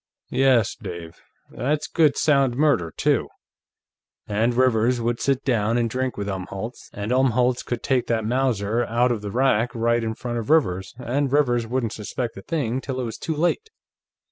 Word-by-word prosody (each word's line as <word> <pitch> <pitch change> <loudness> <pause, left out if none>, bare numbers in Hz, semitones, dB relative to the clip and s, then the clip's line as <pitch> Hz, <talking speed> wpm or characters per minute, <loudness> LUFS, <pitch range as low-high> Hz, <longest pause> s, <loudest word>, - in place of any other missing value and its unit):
"Yes, 130 -4 +3
Dave; 85 -2 -9 0.3
that's 145 +6 -1
good 155 -4 +2
sound 140 -5 +3
murder, 140 - +2
too. - - +1 1.0
And 110 +3 0
Rivers 125 -1 +3
would 120 0 -1
sit 135 -2 0
down 115 -3 +1
and 120 -1 +1
drink 130 +1 -2
with 100 -1 -3
Umholtz, 95 +4 -6
and 105 +3 -4
Umholtz 125 -1 +2
could 120 -1 -4
take 130 -3 +1
that 110 -2 0
Mauser 120 -2 +1
out 120 +2 +2
of 115 -3 -2
the 105 - -5
rack 125 0 +1
right 115 0 +1
in 110 0 -2
front 120 0 -4
of 115 - -6
Rivers 95 - +2
and 130 +2 -1
Rivers 120 -5 +2
wouldn't 120 -2 -1
suspect 115 +2 -4
a 95 - -8
thing 130 - -2
till 130 -1 -4
it - - -1
was 115 -2 -5
too 160 - -3
late. 175 - 0
120 Hz, 175 wpm, -23 LUFS, 110-130 Hz, 1.0 s, Yes